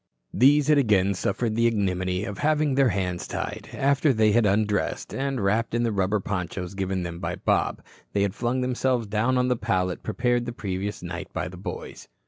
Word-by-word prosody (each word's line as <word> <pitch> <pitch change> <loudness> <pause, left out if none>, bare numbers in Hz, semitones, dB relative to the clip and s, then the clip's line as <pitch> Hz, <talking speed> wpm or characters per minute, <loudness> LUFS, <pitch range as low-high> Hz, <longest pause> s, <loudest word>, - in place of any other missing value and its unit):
These 140 +3 +5
had 150 -1 +5
again 100 -6 +3
suffered 110 +4 -1
the 115 +1 +3
ignominy 95 -4 0
of 100 - -6
having 150 -1 +2
their 135 -1 +4
hands 90 -3 -2
tied, - - -5
after 140 +2 +2
they 110 -3 +3
had 115 0 +4
undressed, 105 0 0
and, 135 -1 -2
wrapped 110 +4 0
in 120 - +1
the 115 - +1
rubber 100 +1 +1
ponchos 90 -1 -4
given 95 -1 -2
them 85 -1 -5
by - - -3
Bob, - - 0 0.3
they 100 - +2
had 100 -2 0
flung 120 +2 -1
themselves 125 -1 0
down 110 +5 +1
on 125 0 +2
the 125 - +2
pallet 90 -5 -1
prepared 120 0 0
the 120 - -4
previous 100 -2 -4
night 85 0 -6
by - - -2
the 90 - -9
boys. 90 - -7
105 Hz, 195 wpm, -25 LUFS, 95-125 Hz, 0.3 s, These